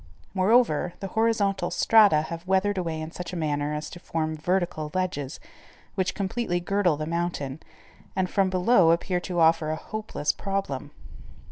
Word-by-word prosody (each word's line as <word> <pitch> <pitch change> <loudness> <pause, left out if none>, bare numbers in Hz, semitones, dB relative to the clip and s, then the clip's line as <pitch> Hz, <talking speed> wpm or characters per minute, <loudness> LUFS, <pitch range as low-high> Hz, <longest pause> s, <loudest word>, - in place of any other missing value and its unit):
Moreover, 190 -4 +3
the 195 - -5
horizontal 205 -5 +1
strata 205 -9 +5
have 170 +2 -7
weathered 190 +1 +2
away 165 -3 -3
in 155 +1 -6
such 180 +1 -7
a - - -3
manner 150 -2 -1
as 150 0 -4
to 175 - -9
form 160 -2 -2
vertical 165 -1 -1
ledges, 175 -6 -2 0.5
which 185 -2 -1
completely 195 -2 -1
girdle 180 -3 +1
the 155 - -3
mountain, 165 -4 -3 0.6
and, 190 -1 +1
from 195 0 +1
below, 185 -1 +4
appear 180 +2 +1
to 175 -1 -3
offer 160 -1 +4
a 155 - 0
hopeless 215 -5 -3
problem. 195 -9 -3
175 Hz, 155 wpm, -26 LUFS, 155-195 Hz, 0.6 s, strata